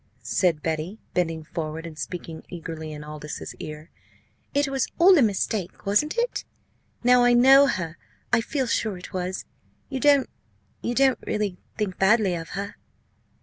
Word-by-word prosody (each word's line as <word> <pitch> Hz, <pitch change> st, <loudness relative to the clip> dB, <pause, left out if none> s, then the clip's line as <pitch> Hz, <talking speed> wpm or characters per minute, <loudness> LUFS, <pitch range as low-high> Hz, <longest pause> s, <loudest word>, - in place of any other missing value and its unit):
said 170 Hz, -5 st, +1 dB
Betty, 160 Hz, +5 st, -2 dB, 0.2 s
bending 165 Hz, -3 st, 0 dB
forward 160 Hz, 0 st, -5 dB
and 165 Hz, -2 st, -8 dB
speaking 165 Hz, 0 st, -6 dB
eagerly 160 Hz, -2 st, -6 dB
in 150 Hz, 0 st, -7 dB
Aldous's 150 Hz, 0 st, -7 dB
ear. 155 Hz, +2 st, -8 dB, 0.6 s
"It 285 Hz, 0 st, +2 dB
was 270 Hz, -2 st, 0 dB
all 365 Hz, +3 st, +7 dB
a 305 Hz, -, +5 dB
mistake 205 Hz, -3 st, -1 dB
wasn't 300 Hz, -, +2 dB
it? 475 Hz, +1 st, 0 dB, 0.6 s
Now 250 Hz, 0 st, +6 dB
I 245 Hz, 0 st, +5 dB
know 270 Hz, +3 st, +7 dB
her 170 Hz, -8 st, -3 dB, 0.3 s
I -, -, +5 dB
feel 265 Hz, +3 st, -1 dB
sure 220 Hz, -4 st, -1 dB
it 180 Hz, -, -11 dB
was. 185 Hz, 0 st, -3 dB, 0.4 s
You 265 Hz, -, -3 dB
don't 285 Hz, -1 st, +5 dB, 0.5 s
you 240 Hz, -, -2 dB
don't 265 Hz, -1 st, +4 dB
really 205 Hz, -4 st, -1 dB, 0.2 s
think 205 Hz, -4 st, -2 dB
badly 195 Hz, -1 st, +4 dB
of 165 Hz, -1 st, -5 dB
her?" 200 Hz, +1 st, -5 dB
190 Hz, 155 wpm, -25 LUFS, 165-250 Hz, 0.6 s, all